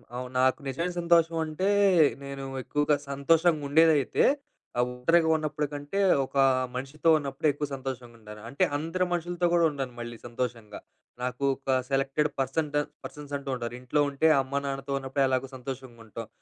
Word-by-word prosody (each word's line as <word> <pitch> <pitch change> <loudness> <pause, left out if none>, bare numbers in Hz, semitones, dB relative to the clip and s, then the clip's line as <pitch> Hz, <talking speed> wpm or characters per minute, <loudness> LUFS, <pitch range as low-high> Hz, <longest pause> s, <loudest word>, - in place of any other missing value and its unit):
అవును 125 0 -5
నాకు 130 +4 +3
నిజమైన 170 +7 -2
సంతోషం 170 -1 +3
అంటే, 155 +5 -2 0.6
నేను 140 0 -6 0.2
ఎక్కువగా 145 +3 +1
సంతోషంగా 155 +3 +2
ఉండేదైతే, 155 -2 +4 0.6
ఆహ్, 125 - +4
ఉత్తరిక 165 +7 +3
ఉన్నప్పటికంటే, 150 +2 -3 0.3
ఒక 135 - -18 0.4
మనిషితో 140 +5 -1
ఉన్నప్పుడే 140 +1 -2
ఎక్కువ 145 0 -3
సంతోషంగా 130 -3 -6
ఉంటాను. 105 -1 -11
అంటే, 135 - 0
అందరు 165 +5 -1
మనుషులతో 175 +1 0
కూడా 170 -1 +4
ఉండను 135 -3 -5
మళ్ళీ 120 -1 -6
సంతోషంగా. 115 -3 -5 0.4
నాకు, 125 +2 -3
ఒక 135 -1 0
సెలెక్టెడ్ 135 +2 +1
పర్సన్ట్ 145 +3 -1 0.3
పర్సన్స్ 145 -1 -9
అంటూ 140 -1 -8
ఉంటారు. 120 -1 -5
ఇంట్లో 130 +4 +1
ఉంటే, 140 +3 +2
అమ్మానాన్నతో 140 0 -3
ఉన్నప్పుడు 135 +1 -1
ఎలాగో 130 0 -1
సంతోషంగా 130 -2 -8
ఉంటాం. 115 +1 -7
140 Hz, 145 wpm, -27 LUFS, 130-155 Hz, 0.6 s, ఉండేదైతే